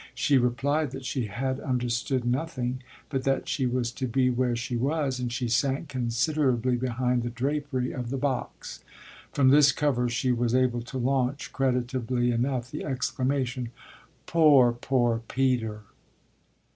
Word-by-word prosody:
She 140 Hz, -2 st, +3 dB
replied 140 Hz, +5 st, 0 dB
that 135 Hz, -1 st, -7 dB
she 125 Hz, -4 st, -2 dB
had 130 Hz, +6 st, -2 dB
understood 125 Hz, -1 st, -1 dB
nothing 130 Hz, -1 st, -2 dB, 0.3 s
but 135 Hz, -2 st, -2 dB
that 135 Hz, 0 st, 0 dB
she 135 Hz, -3 st, 0 dB
was 120 Hz, -1 st, -1 dB
to 130 Hz, +1 st, -3 dB
be 125 Hz, +1 st, +2 dB
where 125 Hz, -1 st, 0 dB
she 120 Hz, +1 st, -3 dB
was, 135 Hz, +1 st, 0 dB
and 125 Hz, -1 st, -2 dB
she 120 Hz, +1 st, -2 dB
sank 135 Hz, +6 st, 0 dB
considerably 125 Hz, 0 st, +1 dB
behind 125 Hz, 0 st, 0 dB
the 120 Hz, -, -3 dB
drapery 130 Hz, +1 st, -2 dB
of 125 Hz, -2 st, -5 dB
the 135 Hz, -, -2 dB
box. 135 Hz, -1 st, -4 dB, 0.5 s
From 135 Hz, -2 st, +4 dB
this 140 Hz, 0 st, +7 dB
cover 125 Hz, -4 st, 0 dB
she 125 Hz, +2 st, 0 dB
was 120 Hz, 0 st, +1 dB
able 125 Hz, -2 st, +2 dB
to 125 Hz, +3 st, -7 dB
launch, 130 Hz, +2 st, -1 dB
creditably 125 Hz, -2 st, 0 dB
enough, 125 Hz, +1 st, -1 dB
the 150 Hz, -, -5 dB
exclamation: 130 Hz, -2 st, -1 dB, 0.6 s
"Poor, 145 Hz, -7 st, +5 dB
poor 120 Hz, -1 st, 0 dB
Peter!" 120 Hz, -5 st, 0 dB
130 Hz, 145 wpm, -27 LUFS, 120-135 Hz, 0.6 s, this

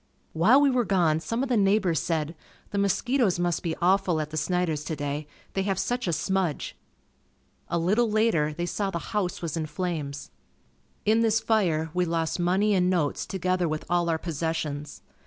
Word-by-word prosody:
While 205 Hz, -, +5 dB
we 285 Hz, -1 st, +4 dB
were 250 Hz, -1 st, +2 dB
gone 175 Hz, -7 st, +2 dB
some 230 Hz, +10 st, -2 dB
of 270 Hz, -, -3 dB
the 250 Hz, -, +2 dB
neighbors 195 Hz, -5 st, +3 dB
said, 160 Hz, -2 st, -1 dB, 0.4 s
"The 200 Hz, -, -1 dB
mosquitoes 205 Hz, +1 st, +1 dB
must 175 Hz, -1 st, 0 dB
be 165 Hz, -2 st, -2 dB
awful 185 Hz, -2 st, +2 dB
at 155 Hz, 0 st, -4 dB
the -, -, -6 dB
Snider's 160 Hz, -1 st, 0 dB
today 145 Hz, -1 st, -3 dB, 0.3 s
they 195 Hz, -, 0 dB
have 195 Hz, -1 st, -1 dB
such 245 Hz, 0 st, -1 dB
a -, -, +1 dB
smudge." 185 Hz, -1 st, -1 dB, 0.9 s
A -, -, -1 dB
little 210 Hz, +8 st, +2 dB
later, 210 Hz, -9 st, +2 dB
they 170 Hz, +3 st, -3 dB
saw 195 Hz, +3 st, -2 dB
the 180 Hz, -, -3 dB, 0.2 s
house 185 Hz, -4 st, -1 dB
was 165 Hz, -2 st, -2 dB
in 160 Hz, -2 st, -2 dB
flames. 150 Hz, -4 st, -4 dB, 0.7 s
In 220 Hz, +2 st, +4 dB
this 225 Hz, -1 st, +3 dB
fire, 180 Hz, -8 st, +1 dB
we 180 Hz, 0 st, +1 dB
lost 165 Hz, 0 st, -1 dB
money 190 Hz, +4 st, +2 dB
and 180 Hz, -2 st, +3 dB
notes 170 Hz, -6 st, 0 dB
together 185 Hz, -2 st, 0 dB
with 155 Hz, 0 st, -3 dB
all 175 Hz, -1 st, +2 dB
our 165 Hz, -, +1 dB
possessions. 155 Hz, -3 st, -4 dB
175 Hz, 180 wpm, -26 LUFS, 160-200 Hz, 0.9 s, While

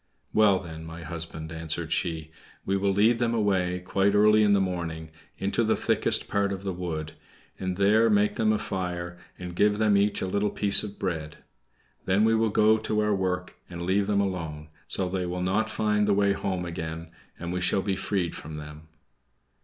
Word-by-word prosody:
"Well, 105 Hz, -3 st, +5 dB
then, 80 Hz, -3 st, -8 dB
my 80 Hz, +1 st, -8 dB
husband," 80 Hz, -1 st, -6 dB
answered 80 Hz, -1 st, -3 dB
she, 80 Hz, -2 st, -2 dB, 0.3 s
"we 95 Hz, -, 0 dB
will 100 Hz, 0 st, +1 dB
lead 110 Hz, +4 st, +3 dB
them 120 Hz, -1 st, +1 dB
away, 95 Hz, -4 st, +1 dB
quite 100 Hz, +3 st, +1 dB
early 105 Hz, +1 st, +5 dB
in 105 Hz, -1 st, +4 dB
the 100 Hz, -, +4 dB
morning, 85 Hz, -4 st, -3 dB, 0.3 s
into 100 Hz, +4 st, 0 dB
the 110 Hz, -, +2 dB
thickest -, -, +1 dB
part 100 Hz, -1 st, 0 dB
of 95 Hz, 0 st, -5 dB
the 95 Hz, -1 st, -2 dB
wood, 85 Hz, -4 st, -4 dB, 0.5 s
and 95 Hz, -1 st, -3 dB
there 110 Hz, +3 st, +4 dB
make 105 Hz, 0 st, +3 dB
them 110 Hz, -2 st, +2 dB
a 110 Hz, -, +2 dB
fire, 90 Hz, -3 st, -4 dB, 0.2 s
and 90 Hz, -1 st, -7 dB
give 105 Hz, +2 st, +3 dB
them 105 Hz, -1 st, +3 dB
each 100 Hz, +1 st, +2 dB
a -, -, -2 dB
little 100 Hz, +2 st, 0 dB
piece 100 Hz, -1 st, +2 dB
of 105 Hz, -1 st, -7 dB
bread. 80 Hz, -4 st, -4 dB, 0.7 s
Then 100 Hz, +3 st, +3 dB
we 115 Hz, -, +4 dB
will 110 Hz, 0 st, +2 dB
go 110 Hz, +1 st, +4 dB
to 110 Hz, 0 st, -1 dB
our 105 Hz, 0 st, +2 dB
work 90 Hz, -2 st, -2 dB
and 85 Hz, -1 st, -6 dB
leave 95 Hz, +3 st, +1 dB
them 100 Hz, -1 st, +2 dB
alone, 80 Hz, -6 st, -4 dB, 0.2 s
so 95 Hz, -, -1 dB
they 90 Hz, 0 st, -2 dB
will 90 Hz, +1 st, -3 dB
not 95 Hz, +4 st, +1 dB
find 105 Hz, -1 st, +1 dB
the 100 Hz, -, +3 dB
way 100 Hz, 0 st, +3 dB
home 95 Hz, -2 st, -2 dB
again, 80 Hz, -1 st, -6 dB, 0.3 s
and 85 Hz, +1 st, -5 dB
we 90 Hz, -, -2 dB
shall 95 Hz, +1 st, +1 dB
be 95 Hz, -1 st, 0 dB
freed 95 Hz, -3 st, -1 dB
from 75 Hz, +1 st, -8 dB
them." 75 Hz, +1 st, -9 dB
95 Hz, 200 wpm, -27 LUFS, 85-105 Hz, 0.7 s, Well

